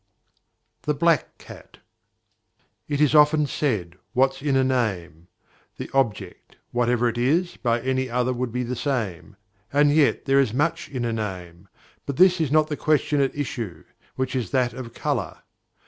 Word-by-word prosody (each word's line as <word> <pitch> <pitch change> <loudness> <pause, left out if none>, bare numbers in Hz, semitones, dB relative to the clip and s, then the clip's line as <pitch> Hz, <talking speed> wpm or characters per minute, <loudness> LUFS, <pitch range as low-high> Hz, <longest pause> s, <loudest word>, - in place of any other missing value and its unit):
THE 150 - -1
BLACK 165 0 +1
CAT. - - -14 1.1
It 145 -1 -2
is 150 -1 +3
often 150 0 +5
said 105 - -2 0.2
"What's 135 +1 +2
in 145 -2 0
a 135 - +4
name?" 95 -11 -2 0.5
the - - -7
object, 105 -9 -2 0.2
whatever 120 0 +1
it 120 0 -2
is, 165 +9 +1
by 120 -1 0
any 130 0 -1
other 125 +1 0
would 125 -1 -3
be 125 +2 -2
the 125 +1 -3
same, 105 - -3 0.4
and 145 +1 +4
yet 150 -2 +2
there 135 0 +3
is 125 -4 +1
much 165 +4 -1
in 125 -4 -3
a 115 - -1
name; 95 -4 -6 0.4
but 140 - -4
this 180 0 +5
is 150 -4 0
not 155 0 +4
the 150 - -3
question 150 -1 +1
at 135 - 0
issue, 115 - -4 0.3
which 130 0 -2
is 120 -7 -2
that 125 -3 +1
of 120 -2 -8
colour. 130 - -3
130 Hz, 165 wpm, -24 LUFS, 115-145 Hz, 1.1 s, often